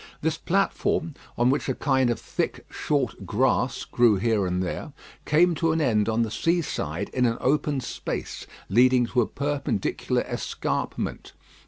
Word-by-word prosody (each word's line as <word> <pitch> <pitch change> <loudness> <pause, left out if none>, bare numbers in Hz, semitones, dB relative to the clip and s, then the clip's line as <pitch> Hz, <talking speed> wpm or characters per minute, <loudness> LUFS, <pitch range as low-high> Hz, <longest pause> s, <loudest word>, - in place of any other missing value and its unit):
This 160 0 0
platform, 170 -3 0 0.2
on 120 +2 +4
which 140 0 -1
a 130 - 0
kind 130 -3 +2
of 120 - -1
thick, - - -3
short 135 -8 -1
grass 125 +4 +1
grew 120 -3 +4
here 105 -1 +1
and 90 +1 -1
there, 140 - -5 0.3
came 170 +3 +4
to 165 0 +1
an 165 - 0
end 115 -8 +2
on 115 +1 +2
the 110 - -3
sea 170 +8 +1
side - - -3
in 125 -1 +1
an 115 0 -1
open 145 0 +1
space, - - -5 0.2
leading 125 +3 +4
to 120 +1 +1
a 110 - 0
perpendicular 140 -7 -1
escarpment. - - -3
130 Hz, 160 wpm, -25 LUFS, 115-150 Hz, 0.3 s, on